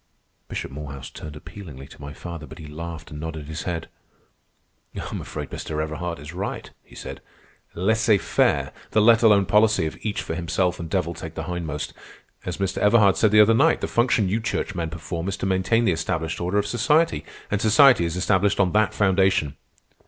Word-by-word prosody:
Bishop - - -5
Morehouse 70 -1 -8
turned 75 -1 -9
appealingly 85 -4 -10
to 70 - -15
my 70 0 -7
father, 85 0 -8
but 80 - -11
he 80 - -10
laughed 80 +1 -7
and 75 - -7
nodded 80 -1 -5
his 80 +2 -6
head. 85 -3 -3 1.1
"I'm - - -5
afraid - - -6
Mr. 75 -1 -4
Everhard 80 +2 -3
is 75 +4 -9
right," 95 +3 -5
he - - -18
said. - - -8 0.5
"Laissez 110 +3 +3
faire, 90 - +1 0.2
the 110 - +2
let 115 +1 +6
alone 105 -4 +5
policy 105 -4 +3
of 80 - -4
each 105 -2 -2
for - - -4
himself 90 +2 -1
and 85 -1 -6
devil 90 -2 -1
take 80 -1 -8
the - - -4
hindmost. 80 -4 -4 0.5
As 90 -2 -3
Mr. 95 -1 -2
Everhard 105 -2 +5
said 110 - +3
the 105 +1 +7
other 110 +2 +6
night, 155 +8 +4
the - - -1
function 120 -4 +2
you 105 +5 0
churchmen 90 -7 -2
perform 85 +1 -5
is 100 - -2
to - - -3
maintain 95 +5 +2
the 95 - +3
established 80 0 -2
order 90 +3 0
of 105 - +2
society, 120 - +2 0.3
and 100 0 0
society 120 -1 +6
is 85 0 -2
established 95 +2 +2
on 95 -3 +3
that 105 -1 +2
foundation." 95 -7 +2
90 Hz, 190 wpm, -24 LUFS, 80-105 Hz, 1.1 s, the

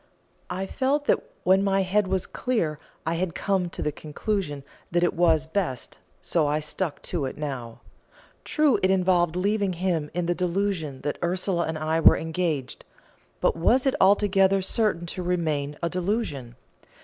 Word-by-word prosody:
I 190 +1 -3
felt 280 +7 0
that - - +3 0.2
when 190 +1 +4
my 195 -1 +2
head 195 +2 +1
was 190 -1 0
clear 170 - -1 0.3
I 165 - 0
had 170 0 -2
come 190 -3 0
to - - -4
the 150 - 0
conclusion 150 0 -3 0.3
that 175 0 +1
it 175 - +2
was 165 -2 +3
best, 160 - -3 0.2
so 160 -4 +1
I 150 +1 +1
stuck 155 +1 -4
to 165 -6 -2
it 130 - -5
now. 130 -6 -5 0.6
True, 295 -9 +2
it 185 - +3
involved 180 -3 +2
leaving 200 +1 +1
him 170 -4 -1
in 175 -1 0
the 175 - +1
delusion 175 -5 -2
that 145 - -3
Ursula 180 0 0
and 160 0 -3
I 155 +1 0
were - - +7
engaged 160 -5 -2 0.6
but - - +2
was 235 +11 +3
it 270 - +3
altogether 195 0 +4
certain 190 -4 0
to 175 +2 -5
remain 155 -5 -1
a - - +2
delusion? 175 - -2
175 Hz, 165 wpm, -25 LUFS, 155-195 Hz, 0.6 s, were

